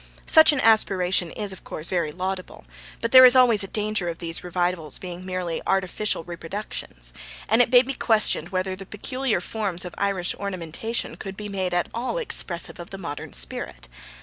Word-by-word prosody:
Such 315 Hz, 0 st, +7 dB
an 295 Hz, -, -1 dB
aspiration 190 Hz, -6 st, +3 dB
is, 205 Hz, +2 st, -3 dB
of 190 Hz, -, -13 dB
course, 155 Hz, -, -4 dB
very 170 Hz, -4 st, 0 dB
laudable, 185 Hz, +2 st, -5 dB, 0.4 s
but 230 Hz, -, -1 dB
there 255 Hz, 0 st, +10 dB
is 255 Hz, 0 st, +8 dB
always 240 Hz, -5 st, +5 dB
a -, -, -4 dB
danger 210 Hz, -3 st, -2 dB
of 165 Hz, -, -5 dB
these 165 Hz, -1 st, -4 dB
revivals 175 Hz, -3 st, -1 dB
being 180 Hz, -1 st, -8 dB
merely 185 Hz, -3 st, -3 dB
artificial 195 Hz, 0 st, 0 dB
reproductions, 165 Hz, -, -6 dB, 0.3 s
and 225 Hz, +4 st, +4 dB
it 245 Hz, -, +2 dB
may 250 Hz, 0 st, +7 dB
be 270 Hz, +1 st, -4 dB
questioned 215 Hz, -, +2 dB
whether 185 Hz, 0 st, -2 dB
the 195 Hz, 0 st, -11 dB
peculiar 255 Hz, +2 st, -2 dB
forms 190 Hz, -2 st, -1 dB
of 180 Hz, -, -7 dB
Irish 195 Hz, -3 st, 0 dB
ornamentation 200 Hz, +3 st, -4 dB
could 195 Hz, -1 st, -7 dB
be 210 Hz, -1 st, -6 dB
made 185 Hz, -3 st, -2 dB
at 175 Hz, -, +1 dB
all 245 Hz, -, -2 dB
expressive 180 Hz, -, -3 dB
of 175 Hz, -, -8 dB
the 195 Hz, -, -7 dB
modern 155 Hz, -7 st, -7 dB
spirit. -, -, -4 dB
190 Hz, 180 wpm, -24 LUFS, 175-215 Hz, 0.4 s, there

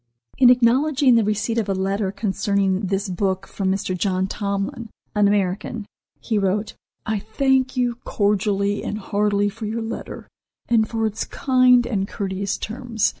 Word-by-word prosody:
In 250 Hz, -2 st, +8 dB
acknowledging 255 Hz, +3 st, +4 dB
the 230 Hz, -1 st, +4 dB
receipt 215 Hz, +2 st, 0 dB
of 210 Hz, -3 st, -2 dB
a 195 Hz, -, +1 dB
letter 195 Hz, +1 st, -1 dB
concerning 200 Hz, -1 st, 0 dB
this 195 Hz, +2 st, -1 dB
book 190 Hz, +1 st, -1 dB
from 190 Hz, -1 st, -2 dB
Mr. 190 Hz, -1 st, -1 dB
John 185 Hz, 0 st, 0 dB
Tomlin, 200 Hz, +3 st, -3 dB, 0.2 s
an 210 Hz, -1 st, +3 dB
American, 205 Hz, +2 st, -1 dB, 0.3 s
he 220 Hz, -3 st, -1 dB
wrote: 205 Hz, +2 st, -1 dB, 0.3 s
"I 215 Hz, -1 st, -1 dB
thank 260 Hz, +4 st, +1 dB
you 245 Hz, -1 st, 0 dB
cordially 205 Hz, 0 st, 0 dB
and 210 Hz, -, -3 dB
heartily 205 Hz, 0 st, 0 dB
for 215 Hz, +1 st, -5 dB
your 225 Hz, +2 st, -3 dB
letter, 225 Hz, -, -6 dB, 0.4 s
and 220 Hz, -2 st, +2 dB
for 225 Hz, -1 st, -1 dB
its 215 Hz, -1 st, -2 dB
kind 255 Hz, -2 st, +3 dB
and 200 Hz, -5 st, -1 dB
courteous 195 Hz, 0 st, -3 dB
terms. 230 Hz, -1 st, -1 dB
210 Hz, 155 wpm, -22 LUFS, 195-230 Hz, 0.4 s, In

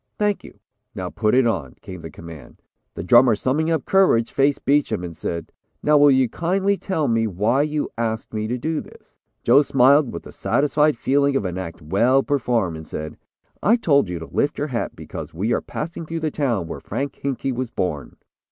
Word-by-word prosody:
"Thank 210 Hz, -1 st, 0 dB
you; -, -, -13 dB, 0.4 s
now -, -, -4 dB
put 105 Hz, +3 st, +1 dB
it 130 Hz, -1 st, +4 dB
on," 85 Hz, -, -2 dB
came 90 Hz, -2 st, -8 dB
the 80 Hz, -, -8 dB
command. 80 Hz, -5 st, -12 dB, 0.3 s
The -, -, -5 dB
drummer 120 Hz, +4 st, +6 dB
summing 145 Hz, +9 st, 0 dB
up 160 Hz, -4 st, 0 dB
courage, 185 Hz, -12 st, +3 dB
faced 140 Hz, +1 st, +1 dB
Beacham 135 Hz, -9 st, +1 dB
and 85 Hz, -2 st, -6 dB
said, 85 Hz, 0 st, -5 dB, 0.3 s
"Now 150 Hz, -, +4 dB
will 145 Hz, 0 st, +7 dB
you 130 Hz, -2 st, +4 dB
kindly 190 Hz, -, 0 dB
tell 175 Hz, -7 st, -2 dB
me 115 Hz, -1 st, +1 dB
why 110 Hz, +8 st, +1 dB
you 150 Hz, 0 st, -1 dB
asked 115 Hz, -1 st, -3 dB
me 110 Hz, 0 st, -2 dB
to 125 Hz, +3 st, -2 dB
do 155 Hz, +5 st, -2 dB
this?" -, -, -18 dB, 0.2 s
Joe 130 Hz, +5 st, +6 dB
smiled 135 Hz, 0 st, +4 dB
with 85 Hz, -, -7 dB
the -, -, -11 dB
satisfied 150 Hz, 0 st, +1 dB
feeling 140 Hz, +2 st, +2 dB
of 120 Hz, -, 0 dB
an 90 Hz, 0 st, -3 dB
act 85 Hz, -3 st, -7 dB
well 120 Hz, -, +3 dB
performed 115 Hz, -, 0 dB
and 80 Hz, -, -10 dB
said: 75 Hz, 0 st, -6 dB, 0.5 s
"I 215 Hz, +5 st, +4 dB
told 140 Hz, -, +2 dB
you 90 Hz, -, -3 dB
to 80 Hz, -, -7 dB
lift 140 Hz, -, -1 dB
your 145 Hz, +1 st, -2 dB
hat 120 Hz, -3 st, -3 dB
because -, -, -8 dB
we 105 Hz, +8 st, 0 dB
are -, -, 0 dB
passing 165 Hz, +1 st, -6 dB
through 165 Hz, 0 st, -4 dB
the 155 Hz, -1 st, -1 dB
town 120 Hz, -, -1 dB
where 80 Hz, -, -6 dB
Frank 140 Hz, +1 st, -5 dB
Hinkey 135 Hz, -1 st, -2 dB
was 125 Hz, -1 st, -3 dB
born." 90 Hz, -, -3 dB
125 Hz, 205 wpm, -22 LUFS, 95-145 Hz, 0.5 s, will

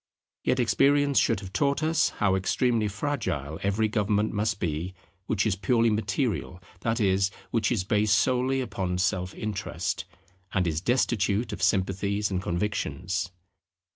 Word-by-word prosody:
Yet 130 Hz, -, +1 dB
experience 140 Hz, +3 st, +3 dB
should 115 Hz, -4 st, +1 dB
have 95 Hz, -1 st, -9 dB
taught 140 Hz, +7 st, +1 dB
us 160 Hz, +1 st, +3 dB
how 95 Hz, -2 st, +1 dB
extremely 110 Hz, +4 st, +1 dB
fragile 95 Hz, -, -3 dB
every 100 Hz, +3 st, +1 dB
government 105 Hz, 0 st, 0 dB
must 105 Hz, 0 st, 0 dB
be 85 Hz, +3 st, -3 dB, 0.3 s
which 105 Hz, -1 st, +1 dB
is 105 Hz, -3 st, +2 dB
purely 115 Hz, +3 st, +2 dB
material, 105 Hz, -3 st, -1 dB, 0.2 s
that 115 Hz, 0 st, -1 dB
is, 95 Hz, -2 st, +2 dB, 0.2 s
which 115 Hz, -1 st, +1 dB
is 110 Hz, -6 st, +1 dB
based 105 Hz, +2 st, +3 dB
solely 130 Hz, +1 st, +1 dB
upon 95 Hz, -7 st, -2 dB
self 90 Hz, 0 st, -1 dB
interest, 105 Hz, -3 st, -3 dB, 0.5 s
and 95 Hz, -2 st, +2 dB
is 80 Hz, -2 st, -1 dB
destitute 110 Hz, -1 st, +1 dB
of -, -, -6 dB
sympathies 100 Hz, +2 st, +1 dB
and 90 Hz, -1 st, -1 dB
convictions. 90 Hz, -2 st, -2 dB
105 Hz, 140 wpm, -27 LUFS, 95-115 Hz, 0.5 s, experience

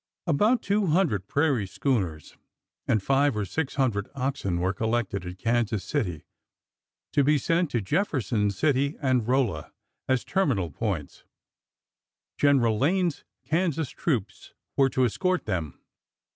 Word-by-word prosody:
About 210 Hz, -, +2 dB
two 200 Hz, 0 st, +1 dB
hundred 150 Hz, -, +1 dB
prairie 140 Hz, -9 st, +1 dB
schooners 95 Hz, -, -2 dB, 0.3 s
" -, -, -54 dB
and 105 Hz, -3 st, +2 dB
five 135 Hz, -1 st, +2 dB
or 105 Hz, -, -1 dB
six 135 Hz, -, -3 dB
hundred 115 Hz, -7 st, 0 dB
oxen 130 Hz, -10 st, -1 dB
were 95 Hz, +2 st, 0 dB
collected 110 Hz, -3 st, -1 dB
at 90 Hz, +1 st, -7 dB
Kansas 115 Hz, -2 st, 0 dB
City 95 Hz, -, -2 dB, 0.9 s
to 145 Hz, -, +4 dB
be 150 Hz, +2 st, +4 dB
sent 165 Hz, +4 st, +1 dB
to 120 Hz, -4 st, -1 dB
Jefferson 120 Hz, -, 0 dB
City 140 Hz, -, +1 dB
and 130 Hz, -5 st, +1 dB
Rolla 130 Hz, -3 st, 0 dB, 0.4 s
as 130 Hz, -1 st, +2 dB
terminal 130 Hz, -, 0 dB
points. 85 Hz, -4 st, -4 dB, 1.2 s
General 125 Hz, -7 st, +3 dB
Lane's 175 Hz, +2 st, +1 dB, 0.2 s
Kansas 160 Hz, -4 st, 0 dB
troops 120 Hz, -, -3 dB, 0.2 s
were 135 Hz, -1 st, +4 dB
to 130 Hz, -1 st, +2 dB
escort 185 Hz, -, 0 dB
them. 85 Hz, -9 st, -3 dB
130 Hz, 130 wpm, -26 LUFS, 100-150 Hz, 1.2 s, to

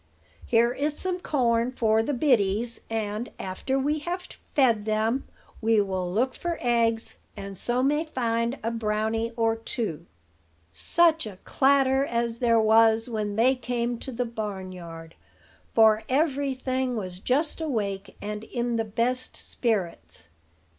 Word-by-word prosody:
Here 235 Hz, +1 st, +3 dB
is 295 Hz, +3 st, -1 dB
some 370 Hz, -1 st, -1 dB
corn 240 Hz, -6 st, +1 dB
for 220 Hz, -3 st, +3 dB
the 270 Hz, +5 st, -1 dB
biddies; 235 Hz, -4 st, +2 dB
and, 220 Hz, +1 st, -2 dB
after 190 Hz, +8 st, -2 dB
we 295 Hz, +3 st, 0 dB
have 355 Hz, +4 st, -4 dB, 0.3 s
fed 235 Hz, -7 st, +3 dB
them, 220 Hz, +4 st, 0 dB, 0.3 s
we 225 Hz, -1 st, +3 dB
will 190 Hz, -3 st, -1 dB
look 250 Hz, +7 st, +1 dB
for 345 Hz, -1 st, -3 dB
eggs, 230 Hz, -2 st, +1 dB, 0.2 s
and 195 Hz, 0 st, -6 dB
so 245 Hz, +6 st, 0 dB
may 295 Hz, +3 st, +2 dB
find 235 Hz, -3 st, -1 dB
a 230 Hz, -, 0 dB
brownie 225 Hz, 0 st, -1 dB
or 225 Hz, -1 st, +2 dB
two." 205 Hz, -, -4 dB, 0.7 s
Such 320 Hz, -, +3 dB
a 195 Hz, -3 st, -9 dB
clatter 270 Hz, -1 st, +3 dB
as 235 Hz, -3 st, -1 dB
there 230 Hz, -2 st, +4 dB
was 225 Hz, +1 st, +4 dB
when 210 Hz, -3 st, -2 dB
they 240 Hz, +4 st, +4 dB
came 240 Hz, -1 st, -2 dB
to 265 Hz, -, -6 dB
the 245 Hz, 0 st, -2 dB
barnyard; 185 Hz, -7 st, -6 dB, 0.6 s
for 220 Hz, -1 st, +6 dB
every 280 Hz, -1 st, +1 dB
thing 260 Hz, -1 st, -1 dB
was 185 Hz, -4 st, -5 dB
just 295 Hz, -, 0 dB
awake, 205 Hz, -9 st, -3 dB
and 210 Hz, +1 st, -4 dB
in 240 Hz, -1 st, -2 dB
the 225 Hz, -, +1 dB
best 245 Hz, +4 st, -1 dB
spirits. 170 Hz, -, -2 dB
230 Hz, 140 wpm, -26 LUFS, 215-260 Hz, 0.7 s, for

